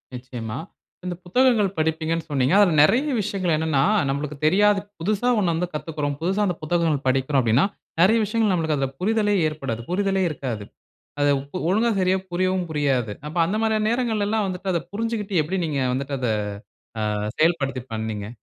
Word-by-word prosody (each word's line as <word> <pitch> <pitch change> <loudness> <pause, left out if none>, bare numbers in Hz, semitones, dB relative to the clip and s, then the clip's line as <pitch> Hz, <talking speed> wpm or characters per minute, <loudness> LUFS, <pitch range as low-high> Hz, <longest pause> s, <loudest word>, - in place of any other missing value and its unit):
நிச்சயமா, 125 -2 -6 0.5
இந்த 180 - -3
புத்தகங்கள் 230 +1 +3
படிப்பீங்கனு 160 +1 -1
சொன்னீங்க. 135 0 +1
அதில 195 -5 +5
நெறைய 255 - +3
விஷயங்கள் 190 -4 -1
என்னன்னா 155 -4 +1 0.3
நம்பளுக்கு 145 +1 -3
தெரியாது 200 +5 +4 0.2
புதுசா 210 +7 0
ஒண்ணு 180 -4 +2
வந்து 175 +2 -1
கத்துக்குறோம். 150 -2 -3
புதுசா 190 +5 0
அந்த 180 -4 -1
புத்தகங்கள் 155 -4 0
படிக்கிறோம் 135 +1 +2
அப்டினா, 115 +7 +3 0.4
நெறைய 215 +6 +5
விஷயங்கள் 215 0 +1
நம்மளுக்கு 160 -4 0
அதில 135 -1 -1
புரிதலே 210 0 +2
ஏற்படாது, 135 -7 -4
புரிதலே 195 0 +1
இருக்காது. 125 -8 -5 0.6
அத 145 - +3
இப்போ 140 +6 -7
ஒழுங்கா 220 +5 +2
சரியா 185 +1 +2
புரியவும் 185 0 0
புரியாது. 135 -8 0 0.2
அப்போ, 160 +3 -4
அந்த 195 +5 -1
மாரியான 215 -1 +1
நேரங்கள்லலாம் 220 -3 0
வந்துட்டு, 190 +1 -3
அத 170 - 0
புரிஞ்சிக்கிட்டு, 210 -4 -1
எப்டி 180 +6 -3
நீங்க 145 -3 -1
வந்துட்டு 140 +2 -2
அத, 125 - -1 0.8
அ - - -1 0.3
செயல்படுத்தி 140 -6 +1
பண்ணீங்க? 110 -2 -4
165 Hz, 155 wpm, -23 LUFS, 140-200 Hz, 0.8 s, அதில